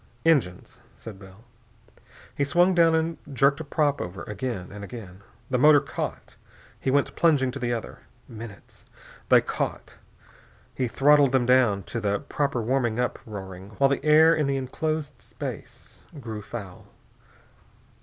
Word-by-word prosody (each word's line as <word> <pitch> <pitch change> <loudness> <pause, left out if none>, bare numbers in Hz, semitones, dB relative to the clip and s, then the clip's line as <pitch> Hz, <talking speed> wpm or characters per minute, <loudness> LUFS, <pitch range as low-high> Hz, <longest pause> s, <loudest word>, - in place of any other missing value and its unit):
"Engines," 125 - +1 0.2
said 105 -4 -11
Bell. 95 +2 -15 0.9
He 145 - 0
swung 175 +6 +3
down 165 -2 +4
and 160 +1 -1
jerked 140 +2 +2
a - - -4
prop 145 -1 0
over. 90 +2 -6
Again, 105 -3 -5
and 100 0 -9
again.... 100 -4 -10 0.3
The 125 - +1
motor 150 +2 +7
caught. 140 - -6 0.4
He - - -2
went 140 +1 +1
plunging 145 -6 +3
to 140 - -7
the 120 -2 -1
other. 115 -2 -5 0.3
Minutes.... 110 -3 -11 0.5
They - - +7
caught. - - -4 0.7
He 130 - -1
throttled 140 +2 +4
them 130 -2 +3
down 120 -6 +3
to 115 +7 -5
the 100 -2 0
proper 140 -4 -2
warming 120 -1 0
up 125 - -1
roaring, 95 -1 -9
while 135 0 +3
the 140 - -1
air 155 +2 +6
in 155 -3 0
the 140 0 0
enclosed 155 +3 -3
space - - -9 0.2
grew 110 -4 -6
foul. 100 -4 -9
130 Hz, 150 wpm, -25 LUFS, 105-145 Hz, 0.9 s, motor